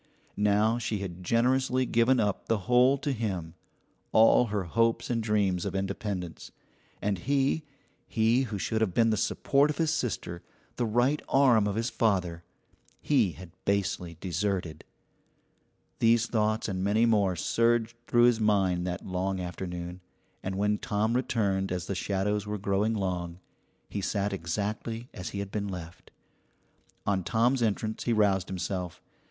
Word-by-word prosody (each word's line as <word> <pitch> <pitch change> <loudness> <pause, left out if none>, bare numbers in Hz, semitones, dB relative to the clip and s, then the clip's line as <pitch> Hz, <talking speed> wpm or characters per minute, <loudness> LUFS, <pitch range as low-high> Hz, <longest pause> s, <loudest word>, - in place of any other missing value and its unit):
Now 105 +3 +2
she 110 -2 -2
had 90 -2 -6
generously 130 +4 +2
given 120 +2 +3
up 105 -3 -1
the 115 - +2
whole 125 +2 +5
to 140 +1 -2
him, 95 -9 -3 0.6
all 115 +2 +5
her 105 -2 -1
hopes 115 +8 +1
and 115 -1 0
dreams 100 -5 +1
of - - -3
independence; 95 -2 -4 0.5
and 100 -2 0
he 140 - +1 0.4
he 115 +3 +2
who 105 - -3
should 110 +3 -1
have 100 -6 0
been 115 -1 +4
the - - +2
support 140 +7 +2
of 150 - -3
his 160 -2 +1
sister, 90 - -3 0.4
the 120 - 0
right 120 +7 +2
arm 125 -6 +4
of 100 - -2
his 115 +2 -1
father 90 -7 0 0.6
he 120 - +2
had 90 +1 -12
basely 90 -4 -1
deserted. 90 -3 -2 1.2
These 115 0 +4
thoughts 110 -1 0
and 95 -2 -2
many 105 +4 +3
more 100 -5 +2
surged 115 +5 +1
through 120 0 +4
his 120 -2 +5
mind 95 -4 +2
that 90 +1 -4
long 95 +1 -2
afternoon, 90 0 -6 0.4
and 95 0 -4
when 105 +1 +1
Tom 105 +2 0
returned 100 -7 0
as 90 -2 -2
the - - -3
shadows 100 +2 -1
were 105 0 -2
growing 100 +3 0
long, 90 -4 -3 0.5
he 100 - -4
sat 100 +1 -1
exactly 105 +6 -3
as 90 -7 -6
he - - -6
had 100 -1 -4
been 100 -1 -2
left. 85 -3 -8 1.0
On 95 -2 0
Tom's 120 +7 +2
entrance 110 0 -1
he 120 - +2
roused 100 -4 +2
himself. 90 -2 -4
105 Hz, 155 wpm, -28 LUFS, 95-115 Hz, 1.2 s, whole